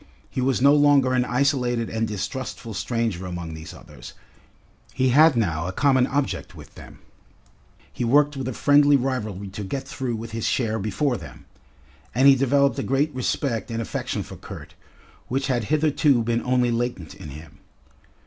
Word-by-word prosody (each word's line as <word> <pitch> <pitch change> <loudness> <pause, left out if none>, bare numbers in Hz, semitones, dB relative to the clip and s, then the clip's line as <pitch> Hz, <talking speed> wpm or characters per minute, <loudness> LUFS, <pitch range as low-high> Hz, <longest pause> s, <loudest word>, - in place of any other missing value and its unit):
He 130 - -2
was 130 0 +1
no 140 +1 +7
longer 145 -3 +4
an 125 -1 +2
isolated 125 -2 0
and 110 0 -2
distrustful 110 +3 -5
stranger 110 -4 -2
among 90 -2 -6
these 80 0 -9
others, - - -12 0.8
he 130 0 +2
had 150 +3 +6
now 85 -7 0
a - - -2
common 130 +4 +3
object 140 0 -2
with - - -13
them, - - -13 1.0
he - - -3
worked 145 +5 +3
with 135 -2 -4
a 130 - -3
friendly 145 +3 +4
rivalry 110 -7 -2
to 100 +2 -7
get 135 +7 -5
through 130 -3 -3
with 115 +1 -7
his 115 0 -2
share 110 -3 0
before 110 +7 -1
them. 75 -8 -12 0.7
And 130 +3 +5
he 140 - +9
developed 140 +1 +2
a - - 0
great 140 +4 0
respect 130 -2 -2
and 115 0 -3
affection 115 - -3
for - - -11
Kurt, - - -10 0.5
which 135 +2 -1
had 125 -5 -1
hitherto 150 -3 +2
been 115 +1 0
only 125 -1 +1
latent 115 -9 -3
in 75 - -10
him. 75 +2 -12
125 Hz, 170 wpm, -23 LUFS, 110-135 Hz, 1.0 s, he